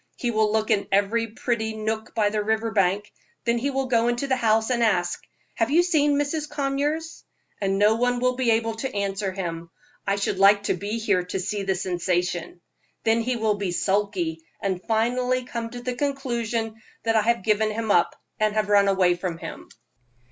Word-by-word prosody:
He 240 - -1
will 215 -1 +2
look 220 0 +1
in 200 - +2
every 205 +4 +2
pretty 220 0 -2
nook 220 +1 -3
by 210 -2 +2
the 210 -1 0
river 220 +1 0
bank, 200 0 +1 0.3
then 235 0 +2
he 275 +4 -1
will 270 -1 -1
go 235 -2 +2
into 240 +3 0
the 265 -1 +1
house 220 0 +2
and 240 -1 +1
ask, 180 -6 +1 0.4
'Have 225 +1 +1
you 330 +5 +5
seen 295 -5 +3
Mrs. 295 +1 -1
Conyers?' 290 +3 -2 0.4
And 195 -1 +1
no 210 +2 +5
one 245 +1 +1
will 255 0 +1
be 250 -2 0
able 225 0 +2
to 265 +3 -3
answer 200 0 -1
him. 170 -3 -5 0.4
I 200 - +2
should 200 -1 -1
like 200 +1 +6
to - - +1
be 205 +4 -3
here 205 -5 +1
to 180 +1 -3
see 200 +3 -2
the 195 -1 0
sensation. 175 -1 -2 0.4
Then 225 +1 +3
he 250 +2 -1
will 220 -2 +1
be 195 -3 -1
sulky, 190 -4 0 0.2
and 190 -2 -2
finally 250 +3 +1
come 235 -2 -4
to 245 +1 -8
the 250 0 -2
conclusion 235 -5 -2 0.2
that 225 0 +1
I 220 - +5
have 235 -2 +1
given 215 +1 +2
him 220 0 -2
up, 175 - +2 0.2
and 215 0 +1
have 215 -2 0
run 200 -1 +5
away 190 -2 +4
from 175 -1 -4
him." - - -8
220 Hz, 200 wpm, -24 LUFS, 200-240 Hz, 0.4 s, like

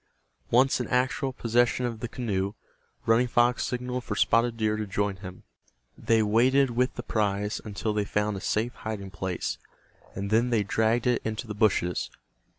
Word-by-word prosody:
Once 130 +3 +4
in 120 - -3
actual 130 +2 0
possession 120 0 +1
of 115 -2 -3
the 120 - -4
canoe, 100 -5 -2 0.5
Running 115 +2 +4
Fox 120 +1 +2
signaled 125 0 -3
for 105 - -4
Spotted 115 +2 +2
Deer 110 -1 +1
to 110 -1 -3
join 100 0 -1
him. 95 -1 -10 0.5
They 115 -1 +2
waded 125 +5 +3
with 125 +2 0
the 120 - -5
prize 105 -2 -1
until 105 0 -3
they 105 -1 +1
found 105 +1 -1
a 95 - -6
safe 110 +3 -1
hiding 100 -3 -6
place, 95 -2 -3 0.6
and 100 +1 -4
then 115 +3 +3
they 115 -4 +2
dragged 110 +3 +1
it 125 - +2
into 110 +2 -3
the 110 - -5
bushes. 100 -4 +1
110 Hz, 170 wpm, -27 LUFS, 105-120 Hz, 0.6 s, Once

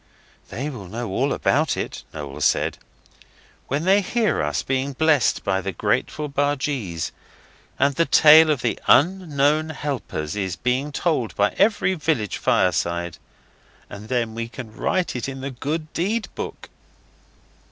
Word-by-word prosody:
'They 135 +5 -4
will 120 -11 -7
know 115 +3 -5
all 135 +8 0
about 155 +2 +1
it,' - - -4
Noel 75 -3 -7
said, - - +1 0.9
'when 140 +4 -1
they 195 +2 +5
hear 215 - 0
us 75 0 -1
being 135 +1 -1
blessed 155 -2 +2
by 95 -1 0
the 95 +1 -3
grateful 150 - -1
bargees, 140 - -1 0.7
and 140 +1 +2
the 165 +4 +2
tale 155 +1 +7
of 145 -5 0
the 120 - -1
Unknown 155 -2 +3
Helpers 135 - -4
is 95 -3 -2
being 125 - -1
told 145 -7 -1
by 100 0 +2
every 200 -2 +2
village 150 - -1
fireside. 85 -1 0 0.7
And 100 +2 -9
then 115 -2 -1
they 115 0 -4
can 115 -2 -10
write 185 +4 -1
it 125 +2 -3
in 135 -1 -7
the 135 +1 -4
Golden 155 +5 -3
Deed 210 +6 -1
book. - - -7
135 Hz, 145 wpm, -23 LUFS, 105-155 Hz, 0.9 s, tale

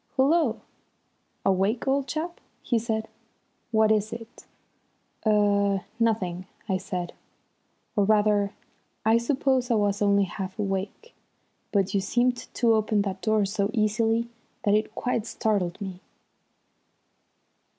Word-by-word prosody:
"Hullo! 310 +6 +3 0.9
Awake, 195 +6 +1
old 275 0 +1
chap?" 335 +3 -4 0.2
he 235 - +1
said. 220 -1 -2 0.6
"What 220 -1 +4
is 215 0 +1
it?" 230 0 -10 0.8
"Er 200 -2 +3
nothing," 190 -6 0 0.2
I 190 -3 +1
said. 180 -2 -4 0.8
"Or 205 -3 +3
rather 210 -1 +3 0.5
I 225 +1 +5
suppose 260 0 +1
I 235 - +3
was 205 -1 +1
only 200 -1 +4
half 190 +1 -5
awake; 200 - -3 0.6
but 195 -2 +1
you 200 - +2
seemed 245 +5 0
to 235 -2 +4
open 215 -1 +2
that 190 -1 -4
door 215 -2 +2
so 200 0 -1
easily 225 +2 +1 0.4
that 205 - +3
it 215 +1 +1
quite 235 -3 -1
startled 200 -7 -1
me." 190 -3 -6
215 Hz, 120 wpm, -26 LUFS, 200-230 Hz, 0.9 s, I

